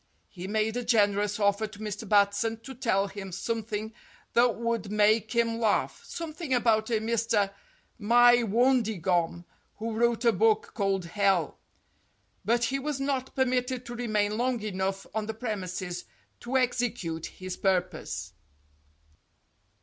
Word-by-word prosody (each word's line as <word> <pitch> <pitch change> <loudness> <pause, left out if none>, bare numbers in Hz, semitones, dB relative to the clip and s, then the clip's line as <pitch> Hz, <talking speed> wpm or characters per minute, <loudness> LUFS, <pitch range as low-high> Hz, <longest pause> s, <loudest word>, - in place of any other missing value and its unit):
He 180 0 -8
made 215 +2 0
a 245 - -2
generous 205 -3 +2
offer 205 +1 +2
to 210 - -13
Mr. 210 0 -6
Batson 205 +2 +2
to 265 - -9
tell 225 -6 +1
him 195 -1 -8
some 225 +5 -2
thing 215 0 -5 0.4
that 240 0 +4
would 230 -3 -2
make 215 +2 +3
him 230 -1 +1
laugh, 220 -3 +1
something 320 -4 -3
about 225 -2 +2
a - - -1
Mr. 220 -2 +1 0.5
Mywondigom, 225 -7 +3 0.3
who 225 +1 -3
wrote 235 +1 +1
a 235 - +6
book 445 - +2
called 195 -3 0
"Hell," 190 -3 +1 0.8
but 235 +4 +2
he 270 +4 0
was 285 0 -3
not 275 -2 -2
permitted 255 -1 0
to 240 - -7
remain 215 -3 0
long 250 0 +1
enough 195 -1 -2
on 215 0 -2
the 220 - -4
premises 185 -6 -4 0.3
to 255 +2 -1
execute 240 -10 -1
his 185 -1 -7
purpose. 180 - -1
220 Hz, 135 wpm, -28 LUFS, 200-240 Hz, 0.8 s, a